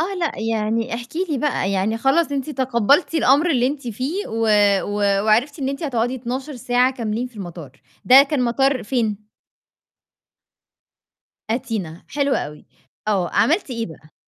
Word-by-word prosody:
آه، 380 +4 -1
لأ، 330 - -2
يعني، 225 +1 -1
احكِ 235 +1 -6 0.2
لي 285 - 0
بقى 255 -8 0
يعني 200 +4 0
خلاص 285 +5 +2
أنتِ 275 +1 -2
تقبلتِ 260 - +2
الأمر 300 +2 +4
اللي 250 -4 +2
أنتِ 275 -2 -4
فيه 265 - -3
و 225 0 -1 0.4
و 200 -1 0
وعرفتِ 240 +8 +2
إن 265 -2 -2
أنتِ 275 +4 -4
هتقعدي 245 -4 -1
12 260 +3 -5
ساعة 245 +2 +2
كاملين 230 0 -3
في 245 - -16
المطار. 175 -7 -8 0.3
ده 265 +2 +8
كان 280 -2 -1
مطار 270 +2 +1
فين؟ 215 -3 -2 2.3
أتينا 205 -8 -3
حلو 280 -1 0
أوي، 150 0 -5 0.4
آه. 190 -4 +1
عملتِ 285 - +1
إيه 230 -2 -3
بقى؟ 155 -2 -14
245 Hz, 150 wpm, -21 LUFS, 215-275 Hz, 2.3 s, ده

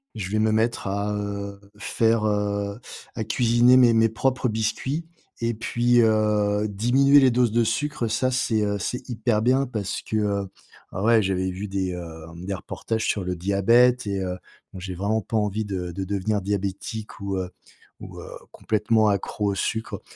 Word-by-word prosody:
Je 95 -3 -4
vais 110 - +1
me 110 0 +2
mettre 110 -1 0
à, 100 +1 -1
heu, 100 -1 -4 0.2
faire 115 -1 +1
heu 100 0 -1 0.4
à 110 - -2
cuisiner 120 +2 +4
mes 125 -2 +6
mes 115 0 +4
propres 130 +3 0
biscuits. 120 +8 -2 0.4
Et 115 0 0
puis, 120 +2 +1
heu, 105 -1 +2
diminuer 130 +7 +4
les 130 -2 +5
doses 120 -1 +2
de 120 +1 +3
sucre, 130 +1 -1
ça, 130 +4 0
c'est 120 -4 +1 0.2
c'est 125 +6 -4
hyper 110 -2 0
bien 130 +4 +3
parce 110 -7 -4
que, - - -5
heu 100 -2 0 0.5
ah 95 - -3
ouais, 115 0 +5
j'avais 95 -1 -1
vu 95 +3 -5
des, 95 -1 -2
heu, 80 -2 -8 0.2
des 100 - -3
reportages 110 +4 -4
sur 100 - 0
le 90 0 -2
diabète 115 +7 +3
et 100 -1 -1
heu, 90 -1 -3 0.4
bon, 95 - -8
j'ai 90 0 -6
vraiment 105 +4 0
pas 115 - -5
envie 105 +1 -1
de 90 -3 -4
de 95 +3 -4
devenir 100 +1 -1
diabétique 100 +2 -4
ou, 100 -1 -2
heu, 90 -1 -3 0.5
ou, - - -9
heu, - - -9 0.2
complètement 110 0 +1
accro 100 +1 -1
au 100 - -3
sucre. 110 +4 -3
105 Hz, 180 wpm, -24 LUFS, 100-115 Hz, 0.5 s, mes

